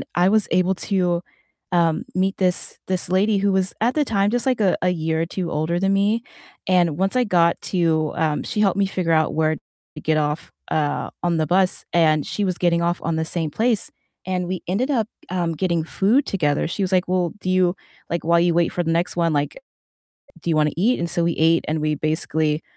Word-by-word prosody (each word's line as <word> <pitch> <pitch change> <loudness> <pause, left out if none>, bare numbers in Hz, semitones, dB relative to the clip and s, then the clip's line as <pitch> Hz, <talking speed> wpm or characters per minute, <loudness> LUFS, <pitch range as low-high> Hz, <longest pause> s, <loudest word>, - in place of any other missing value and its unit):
I 180 +2 +4
was 215 -1 +2
able 185 +2 +2
to, 180 -2 0 0.5
um, 165 -2 +2
meet 190 +1 0
this 180 -2 +1
this 185 -2 -1
lady 200 +2 +2
who 200 0 +2
was, 190 0 +1
at 245 +4 +1
the 300 -2 +2
time 200 -3 +1
just, 245 +2 0
like 255 -4 +1
a 195 -3 +3
a 180 - +2
year 160 -2 -1
or - - -1
2 175 0 -4
older 160 +3 -1
than 195 +1 +1
me 210 +4 +1 0.4
and 175 -4 +2
once 195 +5 0
I 250 - +3
got 170 -4 +2
to 160 -4 0
um, 155 -2 0
she 210 - -3
helped 195 -3 +2
me 200 - +3
figure 180 -3 -2
out 155 0 +2
where 155 0 +1 0.4
to 150 - -8
get 155 0 +1
off, 150 +1 -2 0.2
uh, 150 -2 -1
on 175 -1 +1
the 155 -1 0
bus, 185 +2 +2
and 155 -3 +3
she 205 - -2
was 185 -2 -1
getting 170 -1 +2
off 175 +1 0
on 165 -1 -1
the 160 - -1
same 160 -2 -2
place, 225 +3 0 0.3
and 180 -1 -2
we 185 -1 -3
ended 220 +9 0
up, 225 -5 +1 0.2
um, 175 -2 -1
getting 170 -1 0
food 205 - +1
together, 150 -7 0
she 195 +4 -2
was 190 - -2
like, 185 0 +2
"Well, 180 -2 0
do 185 - -4
you 185 0 +2 0.3
Like, 170 - -2
while 170 0 +4
you 170 0 +2
wait 170 0 +2
for 175 - -1
the 165 - -1
next 170 +2 0
one, 165 -2 +2
like, 145 0 -1 0.9
do - - -5
you - - +2
wanna 150 -1 +3
eat?" 225 +8 +2
And 170 -1 -2
so 170 -1 0
we 170 - +1
ate, 165 +1 +3
and 155 0 -1
we 155 0 0
basically 155 0 -1
175 Hz, 225 wpm, -22 LUFS, 160-190 Hz, 0.9 s, I